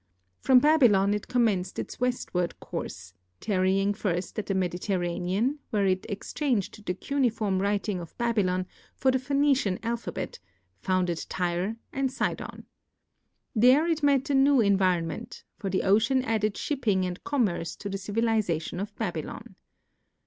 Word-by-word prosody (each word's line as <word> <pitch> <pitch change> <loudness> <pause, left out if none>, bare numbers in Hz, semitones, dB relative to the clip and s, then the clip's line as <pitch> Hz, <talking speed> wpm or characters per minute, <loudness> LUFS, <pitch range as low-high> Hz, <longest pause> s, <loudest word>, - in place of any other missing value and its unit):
From 260 - +5
Babylon 245 -9 +5
it 210 - -3
commenced 210 -7 +1
its - - -5
westward 240 -8 -1
course, 95 0 -6 0.3
tarrying 195 0 +1
first 190 -2 -2
at 210 - -5
the 195 - 0
Mediterranean, 185 - -1
where 205 -4 +1
it 185 -1 0
exchanged 210 0 -2
the 180 - 0
cuneiform 220 -6 0
writing 200 -1 0
of 170 -2 -10
Babylon 200 -6 +1 0.3
for 260 - +2
the 260 - +1
Phoenician 275 -7 +2
alphabet, 235 +1 -4 0.4
founded 180 -3 0
Tyre 180 +4 -1 0.2
and 270 -2 0
Sidon. 265 - -3 0.9
There 255 +7 +5
it 325 -2 0
met 285 -1 +2
a - - +2
new 275 0 +5
environment, 185 -5 +1 0.2
for 200 -4 -3
the 190 - 0
ocean 230 +7 +3
added 215 -3 0
shipping 215 -10 0
and 180 0 -5
commerce 190 - 0
to 205 - -7
the 195 0 -3
civilization 205 -6 -1
of 200 +2 -5
Babylon. - - -5
205 Hz, 135 wpm, -27 LUFS, 185-250 Hz, 0.9 s, From